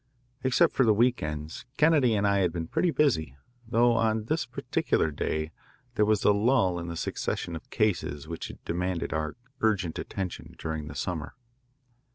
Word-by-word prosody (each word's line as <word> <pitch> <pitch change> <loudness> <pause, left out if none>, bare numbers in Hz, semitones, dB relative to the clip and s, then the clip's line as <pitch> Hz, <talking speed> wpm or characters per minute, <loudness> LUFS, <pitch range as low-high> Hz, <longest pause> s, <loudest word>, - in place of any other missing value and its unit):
Except 135 +6 +4
for 135 - +3
the 110 -3 +4
week 120 +3 +3
ends, 75 +6 -5
Kennedy 150 -7 +4
and 100 0 +1
I 100 0 +3
had 90 -3 +2
been 85 -1 -3
pretty 180 - +1
busy, 80 - +1 0.3
though 120 +1 +4
on 110 -1 +1
this 155 +2 -1
particular 80 -8 0
day 80 +2 -2 0.4
there 105 -3 +3
was 105 -1 +2
a - - +6
lull 100 -4 +3
in 85 - -5
the 85 0 -5
succession 85 - -2
of 80 - -9
cases 85 -9 0
which 85 0 -5
had - - -12
demanded 90 0 -2
our 80 0 -2 0.2
urgent 100 -7 +1
attention 95 -2 -5
during 80 -2 -4
the 75 - -8
summer. 80 +1 -3
95 Hz, 175 wpm, -28 LUFS, 80-115 Hz, 0.4 s, a